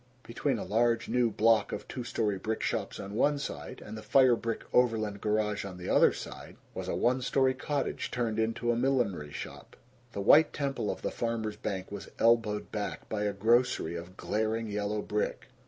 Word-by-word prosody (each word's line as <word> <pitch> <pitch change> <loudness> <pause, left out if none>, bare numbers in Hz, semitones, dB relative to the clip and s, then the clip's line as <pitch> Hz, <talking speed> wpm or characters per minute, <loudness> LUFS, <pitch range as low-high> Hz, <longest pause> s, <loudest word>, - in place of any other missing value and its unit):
Between 125 +2 -1
a - - -4
large 115 +3 +2
new 125 -2 +3
"block" 110 0 +3
of - - -5
two 125 - -5
story 105 -5 -1
brick 110 +2 -2
shops - - -2
on 100 +1 -6
one 145 +6 +2
side, 75 - -6
and 105 - -7
the 110 - -7
fire 125 +3 +5
brick 115 -1 -3
Overland 110 -5 +2
garage 105 -1 0
on 95 -2 -7
the 90 - -6
other - - +6
side, - - -9 0.2
was - - -5
a - - -1
one 130 +2 +2
story 130 +1 +2
cottage 140 +1 -2
turned 115 -3 -1
into 115 +2 0
a - - +1
millinery 115 - 0
shop. - - -8 0.4
The - - -4
white 150 +10 +6
temple 140 -7 -2
of - - -4
the - - -1
Farmers' 115 -2 -2
Bank 100 -3 -4
was 100 - -7
elbowed 115 -2 +2
back 105 -2 -4
by 105 -1 -1
a 105 - +1
grocery 110 -4 +2
of 85 +2 -8
glaring 110 +1 -1
yellow 105 0 -2
brick. 105 0 -2
110 Hz, 190 wpm, -30 LUFS, 105-120 Hz, 0.4 s, other